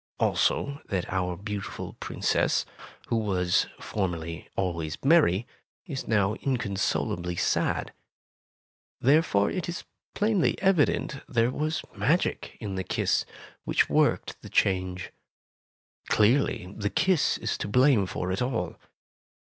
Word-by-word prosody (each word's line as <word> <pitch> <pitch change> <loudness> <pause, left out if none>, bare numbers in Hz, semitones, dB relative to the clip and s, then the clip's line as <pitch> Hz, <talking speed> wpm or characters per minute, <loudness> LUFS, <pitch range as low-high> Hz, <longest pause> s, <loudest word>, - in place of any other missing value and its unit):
Also 140 +1 +1
that 95 -2 -2
our 90 -2 -1
beautiful 100 0 -5
Princess, - - +1 0.4
who 115 - +2
was 95 -5 +1
formerly 85 -5 -3
always 85 -5 -2
merry, 135 - +4 0.4
is 140 -8 -5
now 105 -2 +2
inconsolably 100 -7 -1
sad. - - 0 1.1
Therefore, 135 -7 +3
it 180 -2 -3
is 175 - -5 0.3
plainly 210 -4 +2
evident 165 -6 +2
there 120 -1 +2
was 155 +3 -2
magic 170 +5 0
in 105 -3 -4
the 95 0 -2
kiss, - - 0 0.4
which - - +2
worked - - +1
the - - -10
change. 95 -1 0 1.0
Clearly, 105 -4 +2
the 100 -1 -1
kiss 185 - +2
is - - -2
to - - -3
blame 125 -2 +4
for 90 0 -3
it 95 - -1
all. 125 -2 -2
105 Hz, 115 wpm, -27 LUFS, 95-140 Hz, 1.1 s, merry